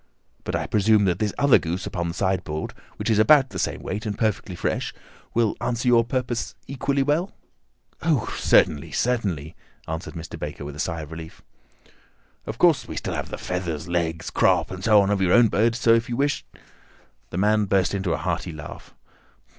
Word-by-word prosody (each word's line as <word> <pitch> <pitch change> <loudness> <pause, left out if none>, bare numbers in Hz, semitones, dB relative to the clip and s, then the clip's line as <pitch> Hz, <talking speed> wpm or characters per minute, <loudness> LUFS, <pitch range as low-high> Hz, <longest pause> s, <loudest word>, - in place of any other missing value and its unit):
But - - -2
I - - -1
presume 105 0 +3
that 90 -1 +1
this 105 -1 0
other 140 -1 +5
goose 85 +3 -3
upon 85 -1 -3
the 85 - -4
sideboard, 90 -5 -2 0.2
which - - -4
is 110 -2 +3
about 135 +3 +6
the - - -5
same - - -2
weight 105 +2 -4
and 105 - -3
perfectly 105 -4 -1
fresh, - - -2 0.4
will 115 -2 +2
answer 120 +1 -1
your 120 -1 +5
purpose 125 0 -3
equally 140 +1 0
well?" 155 +7 0 0.7
"Oh, 155 -8 0
certainly, 75 +1 +3
certainly," 95 - -1 0.3
answered 80 +3 -5
Mr. 85 0 -7
Baker 75 -1 -6
with 75 0 -7
a - - -10
sigh 80 -1 -2
of 75 0 -9
relief. 80 0 -9 1.0
"Of 110 - -5
course, 170 -1 +4
we - - -6
still - - -3
have - - -4
the - - -5
feathers, 90 -4 -4
legs, 85 -2 -2
crop, - - +2
and 95 0 -7
so 105 0 +6
on 100 - 0
of 100 -1 +1
your 90 -1 +3
own 120 -2 +6
bird, 115 +3 +2
so 115 -1 +4
if 115 +1 +1
you 120 - -2
wish—" 145 +1 0 0.8
The - - -5
man 105 +2 +3
burst 95 -2 +1
into 95 -3 -1
a - - 0
hearty 85 +1 -2
laugh. 75 -2 -10
100 Hz, 195 wpm, -24 LUFS, 85-120 Hz, 1.0 s, about